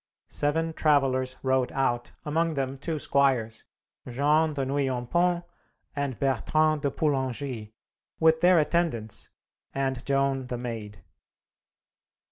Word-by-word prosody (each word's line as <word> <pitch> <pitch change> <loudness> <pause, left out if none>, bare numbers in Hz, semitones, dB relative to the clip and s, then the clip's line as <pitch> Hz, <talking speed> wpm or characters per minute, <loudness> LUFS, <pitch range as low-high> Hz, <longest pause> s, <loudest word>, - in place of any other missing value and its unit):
Seven 160 +3 0
travellers 135 -4 +2
rode 130 -1 +1
out, 120 -3 0
among 160 +2 0
them 135 -1 -2
two 160 +2 -3
squires, 130 -6 +1 0.4
Jean 150 +4 +2
de 135 -2 -1
Nouillompont 140 +6 0 0.5
and 140 -4 -2
Bertrand 155 +4 +2
de 140 - +1
Poulengy, 130 -6 -2 0.5
with 160 0 +4
their 180 0 +6
attendants, 150 -9 0 0.5
and 135 -2 -1
Joan 135 -1 0
the 125 - -3
Maid. 110 -6 -6
135 Hz, 105 wpm, -27 LUFS, 130-155 Hz, 0.5 s, their